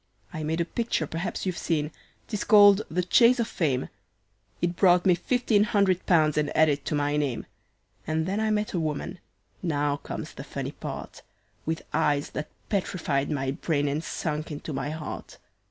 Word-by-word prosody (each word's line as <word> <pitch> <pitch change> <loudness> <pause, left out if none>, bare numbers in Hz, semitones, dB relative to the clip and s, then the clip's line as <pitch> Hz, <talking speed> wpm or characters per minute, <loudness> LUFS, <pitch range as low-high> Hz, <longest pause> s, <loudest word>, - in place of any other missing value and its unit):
"I 155 - -4
made 160 +2 -1
a 170 - +1
picture 230 -3 -1
perhaps 165 +6 -4
you've 185 -2 -2
seen, 150 -2 -1 0.4
'tis 210 -2 -3
called 205 -2 +7
the 180 +2 0
`Chase 235 +7 +5
of 230 - +1
Fame.' 135 - 0 0.7
It 175 0 0
brought 180 -1 +4
me 185 - +6
fifteen 215 +3 +2
hundred 200 -4 +1
pounds 155 -4 +4
and 150 -1 0
added 150 -3 +3
to - - -1
my 145 0 +1
name, 135 -7 -1 0.6
And 160 +1 0
then 195 +4 -1
I 220 0 +1
met 210 0 0
a 175 - 0
woman 160 +3 -3 0.4
now 145 -4 0
comes - - -7
the - - -8
funny - - -5
part - - -7 0.5
With 160 0 -2
eyes 145 -2 +1
that 150 - -4 0.2
petrified 170 -8 -1
my 135 -3 -1
brain, 145 0 0
and 145 +3 -1
sunk 155 -1 -3
into 150 +1 -5
my 135 +1 -2
heart. 155 0 -6
160 Hz, 175 wpm, -27 LUFS, 150-190 Hz, 0.7 s, called